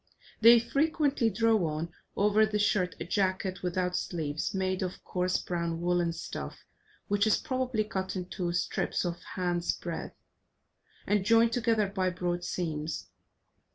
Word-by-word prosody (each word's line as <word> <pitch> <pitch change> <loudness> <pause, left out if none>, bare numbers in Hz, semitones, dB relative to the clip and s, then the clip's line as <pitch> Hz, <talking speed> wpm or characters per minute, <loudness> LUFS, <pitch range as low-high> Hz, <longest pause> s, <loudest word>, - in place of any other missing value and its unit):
They 230 +1 +9
frequently 280 0 +1
draw 220 0 +2
on, 165 +2 -4 0.2
over 210 +2 +4
the 215 -1 +1
shirt, 205 -3 +1
a - - -4
jacket 185 0 0
without 180 0 -1
sleeves, 155 -4 -2
made 190 -1 -1
of 185 -1 -4
coarse 180 0 0
brown 170 -2 -2
woollen 175 -1 +1
stuff, 165 - -7 0.4
which 205 +1 +2
is 215 - +4
properly 255 -5 -1
cut 190 -3 -3
into 180 -1 -3
strips 175 +1 -1
of 175 -1 -2
a 180 - -10
hand's 175 -1 +1
breath, - - -6 0.9
and 205 -2 +2
joined 230 +2 +4
together 225 -3 +2
by 190 -1 0
broad 175 -1 -2
seams. 155 - -3
185 Hz, 145 wpm, -30 LUFS, 175-215 Hz, 0.9 s, They